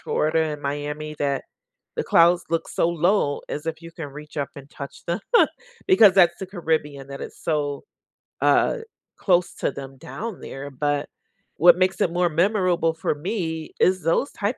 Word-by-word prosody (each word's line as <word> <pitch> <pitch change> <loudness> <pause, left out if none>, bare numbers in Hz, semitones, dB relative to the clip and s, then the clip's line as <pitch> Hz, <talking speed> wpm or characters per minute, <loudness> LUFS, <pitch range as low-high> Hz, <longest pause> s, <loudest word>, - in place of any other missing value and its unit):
Florida, 160 +1 +1
and 150 -2 -4
Miami, 150 +2 -4
that 140 -1 -1 0.5
the - - -1
clouds 170 +1 +4
look 165 -1 -1
so 165 - +1
low 170 -3 +1
as 150 +2 -5
if 160 0 -4
you 165 - -9
can 160 -4 -7
reach 150 +2 -11
up 140 -1 -2
and 140 0 -11
touch 140 -1 -9
them, 170 +4 0 0.7
because 220 - +7
that's 175 -3 +5
the 190 - -5
Caribbean, 155 -7 -2
that 140 0 -7
it's - - -9
so, 145 -3 -1 0.6
uh, - - +3 0.4
close 180 -2 +2
to - - -1
them 135 -1 -9
down 190 - -7
there. 135 +1 -7
But, 145 +1 -1 0.5
what 175 +2 +7
makes 185 0 +1
it 170 - +2
more 175 0 +2
memorable 175 -1 +2
for 160 - -1
me 160 -1 -3
is 185 0 +3
those 165 - +1
type 210 +4 -2
160 Hz, 175 wpm, -24 LUFS, 145-180 Hz, 0.7 s, because